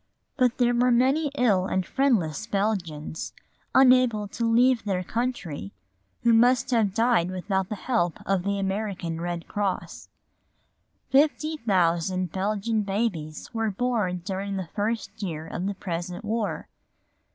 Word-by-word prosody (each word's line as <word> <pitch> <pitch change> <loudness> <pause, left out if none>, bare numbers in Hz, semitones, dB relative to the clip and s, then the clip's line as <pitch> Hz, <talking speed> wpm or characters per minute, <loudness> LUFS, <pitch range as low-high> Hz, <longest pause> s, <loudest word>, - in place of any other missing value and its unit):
But 250 -3 +2
there 245 -1 +3
were 245 +1 +3
many 265 +6 +3
ill 200 -7 +3
and 190 -1 0
friendless 220 - +1
Belgians, 185 -8 -2 0.4
unable 255 -5 +5
to 230 +2 -1
leave 245 +1 +4
their 190 -3 -1
country, 180 - -3 0.5
who 235 - +5
must 245 +3 +4
have 215 -5 +2
died 230 -7 +3
without 190 +1 -2
the 215 - -3
help 200 -6 0
of 195 -2 +1
the 200 +2 -1
American 195 -4 -3
Red 175 -1 -4
Cross. 205 -2 -3 1.0
Fifty 305 +3 +3
thousand 185 - +1
Belgian 210 +3 0
babies 195 -7 -3
were 225 -1 0
born 205 -5 -1
during 195 +1 -3
the 185 -4 -4
first 220 +2 -3
year 160 -5 -4
of 180 +3 -4
the 200 - -2
present 175 +2 -5
war. 220 0 -2
205 Hz, 135 wpm, -26 LUFS, 185-235 Hz, 1.0 s, unable